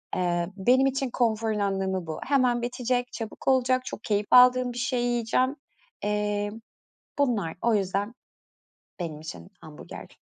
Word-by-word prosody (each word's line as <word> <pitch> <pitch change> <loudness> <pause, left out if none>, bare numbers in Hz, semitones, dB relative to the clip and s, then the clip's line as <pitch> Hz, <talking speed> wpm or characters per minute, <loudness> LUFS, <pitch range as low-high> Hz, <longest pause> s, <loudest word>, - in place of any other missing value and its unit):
Eee, 175 -1 0
benim 255 +7 +4
için 270 0 -1
konforun 220 -3 0
anlamı 190 -3 -1
bu. 155 - -5
Hemen 255 -3 +2
bitecek, 245 0 -1
çabuk 225 -2 -7
olacak, 255 -1 +3
çok 220 - -7
keyif 205 -1 0
aldığım 250 0 +6
bir - - -8
şeyi 245 0 0
yiyeceğim. 240 +3 +1 0.5
Eee, 205 0 -1 0.7
bunlar 225 -12 +1
o 235 -1 +3
yüzden 200 +2 -1 0.9
benim 160 -4 -4
için 165 +3 -9
hamburger. 155 -1 -11
225 Hz, 135 wpm, -26 LUFS, 195-250 Hz, 0.9 s, aldığım